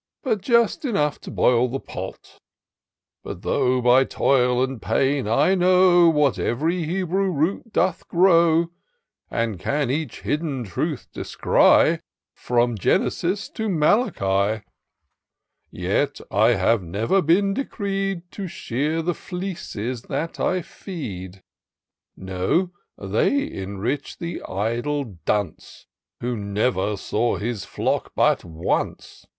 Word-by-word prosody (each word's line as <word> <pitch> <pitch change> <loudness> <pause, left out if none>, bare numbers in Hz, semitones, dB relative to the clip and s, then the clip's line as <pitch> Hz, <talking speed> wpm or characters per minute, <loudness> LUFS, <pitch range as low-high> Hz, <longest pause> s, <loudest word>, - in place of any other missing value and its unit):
But 220 -7 0
just 235 - +2
enough 175 - 0
to - - -9
boil 125 0 +3
the 135 +2 -3
pot. - - -9 0.8
What - - -8
though, 125 0 +1
by 125 +2 +6
toil 125 -2 +2
and 130 -3 -4
pain, 135 -3 +1
I 115 - +3
know 180 -1 +5
Where 150 -4 +3
ev'ry 160 +8 0
Hebrew 190 +3 0
root 180 +8 -1
doth 185 -2 0
grow, 170 -2 +4 0.6
And 115 -5 -2
can 140 +5 0
each 150 -3 -3
hidden 145 -4 -2
truth 95 -6 -3
descry - - +3 0.3
From 120 -2 0
Genesis 185 - 0
to 220 -1 -3
Malachi; 110 - +1 1.1
Yet 100 +11 -1
I 110 +5 +4
have 105 +3 +2
never 105 - 0
been 195 +5 +3
decreed 195 -6 -2
To 195 -2 -5
shear 155 +2 -2
the 175 +2 0
fleeces 165 - -5
that 165 +2 -3
I 185 -1 0
feed: 95 - -8 0.7
No, 95 - -1 0.3
they 110 - 0
enrich 100 +9 -4
the 170 0 -5
idle 115 - -2
dunce. 100 -6 -2 0.4
Who 125 0 -2
never 105 0 -1
saw 115 +5 0
his 110 -1 -3
flock - - -2
but - - +3
once. 80 0 -3
140 Hz, 115 wpm, -23 LUFS, 110-180 Hz, 1.1 s, by